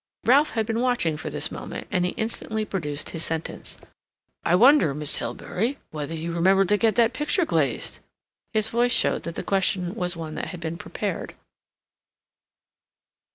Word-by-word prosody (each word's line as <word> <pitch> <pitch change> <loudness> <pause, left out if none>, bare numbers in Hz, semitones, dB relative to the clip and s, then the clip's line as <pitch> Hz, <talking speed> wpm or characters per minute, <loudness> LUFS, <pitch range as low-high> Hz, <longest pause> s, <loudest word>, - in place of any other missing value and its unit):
Ralph 285 +5 +5
had 220 - +2
been 225 +1 -1
watching 245 -11 +1
for 150 - -5
this - - -2
moment, - - -6
and 180 -4 +2
he 180 - 0
instantly 220 -1 -2
produced 150 -8 -3
his 165 - -4
sentence. 160 0 -4 0.7
"I 170 - +3
wonder, 240 - +6
Miss 150 0 0
Hilbery, 235 +9 -2
whether 155 +1 -4
you 165 +1 -4
remembered 190 +3 +4
to 210 - +4
get 220 -1 +2
that 235 +1 +4
picture 300 +6 +1
glazed?" - - 0 0.5
His 220 0 +2
voice 240 +1 +2
showed - - +3
that 165 - -8
the - - -4
question 185 -2 +1
was 180 -5 -2
one 160 -2 -6
that - - -4
had 180 - -7
been 165 0 -4
prepared. - - -4
190 Hz, 165 wpm, -25 LUFS, 165-230 Hz, 0.7 s, wonder